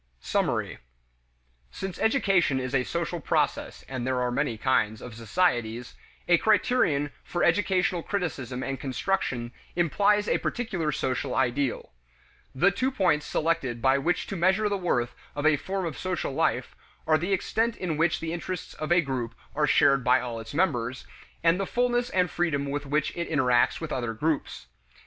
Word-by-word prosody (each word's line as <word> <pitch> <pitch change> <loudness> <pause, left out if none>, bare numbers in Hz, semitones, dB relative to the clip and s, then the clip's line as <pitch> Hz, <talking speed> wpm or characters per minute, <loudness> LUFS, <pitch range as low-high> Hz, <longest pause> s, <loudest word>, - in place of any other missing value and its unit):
Summary. - - -1 0.9
Since 190 - -6
education 195 - +2
is 130 0 -4
a 130 -2 +3
social - - -2
process, - - -1
and 130 -2 -4
there 130 -1 0
are 125 0 0
many 120 -3 -1
kinds 110 -3 +1
of 125 - -9
societies, 120 -2 0 0.3
a 175 -1 +5
criterion 185 - +2
for 175 - -2
educational 180 0 +2
criticism 130 - -3
and 135 0 -3
construction 130 -4 -2 0.2
implies 205 +5 +2
a - - +2
particular 190 -10 -2
social 130 -2 -2
ideal. 130 - 0 0.6
The 180 +9 +4
two 255 +8 0
points 180 - +1
selected 155 -7 0
by 135 +2 +3
which 175 +5 0
to 195 - -5
measure 190 +4 +2
the 205 - 0
worth 125 -11 0 0.2
of 145 +1 -3
a 155 -1 +6
form 190 +5 -3
of 165 - -5
social 185 -6 -2
life - - 0 0.3
are 155 0 +3
the 175 +4 -2
extent 225 +4 0
in 175 -4 -2
which 160 +1 +1
the 165 0 -3
interests 180 +1 -5
of 155 +2 -5
a 175 0 +6
group 130 -6 -3 0.2
are 150 0 +1
shared 140 -2 +4
by 125 - +4
all 120 -2 -4
its 115 +5 -9
members, 130 -8 0 0.4
and 165 +2 +4
the 195 - -1
fullness 245 0 +1
and 180 -5 +1
freedom 155 -5 0
with 145 0 -3
which 150 +2 0
it 170 0 -3
interacts 125 -6 +3
with 165 -2 -5
other 120 -3 -2
groups. 150 - -2
155 Hz, 170 wpm, -27 LUFS, 130-185 Hz, 0.9 s, a